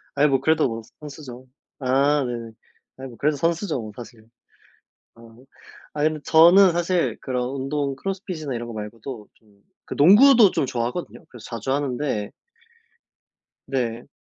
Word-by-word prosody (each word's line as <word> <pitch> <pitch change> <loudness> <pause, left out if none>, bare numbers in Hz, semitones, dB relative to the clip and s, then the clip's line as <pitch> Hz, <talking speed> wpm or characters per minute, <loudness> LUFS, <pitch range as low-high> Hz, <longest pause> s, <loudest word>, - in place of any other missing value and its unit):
아이 145 +1 +4
뭐 135 -2 +2
그래도 155 0 +2
뭐 115 -1 -5 0.2
선수죠. 135 -4 -10 0.3
아 140 +2 +2
네네. 115 -2 -5 0.5
아이 135 0 -8
뭐 120 -3 -13
그래도 150 0 0
선수죠 165 +1 -1
뭐 110 - -8
사실. 115 -2 -12 0.9
아. 115 - -19 0.7
아 150 - -2
근데 155 -1 0
저는 175 +4 +6
사실 175 +1 0
그런 125 -2 -2
운동 140 +1 -3
크로스핏이나 180 - -5
이런 120 0 -5
거 115 - -8
말고도 110 +2 -8
좀 100 -2 -29 0.2
그 - - -6
농구도 210 - +7
좀 - - 0
좋아하거든요. 125 +7 -4
그래서 120 -3 -14
자주 115 +2 -4
하는데 135 -6 -2 1.4
네. 120 -2 -3
135 Hz, 295 characters per minute, -23 LUFS, 120-155 Hz, 1.4 s, 농구도